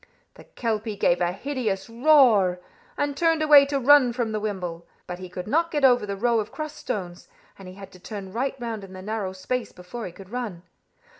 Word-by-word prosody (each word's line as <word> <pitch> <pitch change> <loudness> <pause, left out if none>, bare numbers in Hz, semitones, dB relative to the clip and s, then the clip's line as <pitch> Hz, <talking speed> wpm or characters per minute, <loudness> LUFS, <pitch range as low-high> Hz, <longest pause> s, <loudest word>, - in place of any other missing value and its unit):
The - - -16
kelpie 220 -2 -3
gave 175 -2 +2
a 175 0 +2
hideous 210 -3 -3
roar, 230 -8 +4 0.4
and 290 -1 -1
turned 325 0 +2
away 290 -2 +7
to 280 -1 -1
run 270 -2 +5
from 235 -2 -2
the 215 - -2
wimble. 180 -5 -5 0.2
But 180 0 -7
he 185 -1 -8
could 180 0 -6
not 330 +8 +1
get 295 -4 +1
over 245 -5 +4
the 200 - -3
row 230 +3 +1
of 210 - -4
crossed 310 -1 -6
stones, 180 -4 -5 0.3
and 190 - -11
he 185 - -10
had 195 -1 -11
to 185 - -15
turn 195 0 -8
right 265 +4 -1
round 230 -4 -5
in 190 -1 -11
the 185 0 -9
narrow 210 -2 -3
space 230 +6 -4
before 185 +6 -8
he - - -9
could 190 +3 -14
run. 225 -9 -5
215 Hz, 215 wpm, -25 LUFS, 185-255 Hz, 0.4 s, away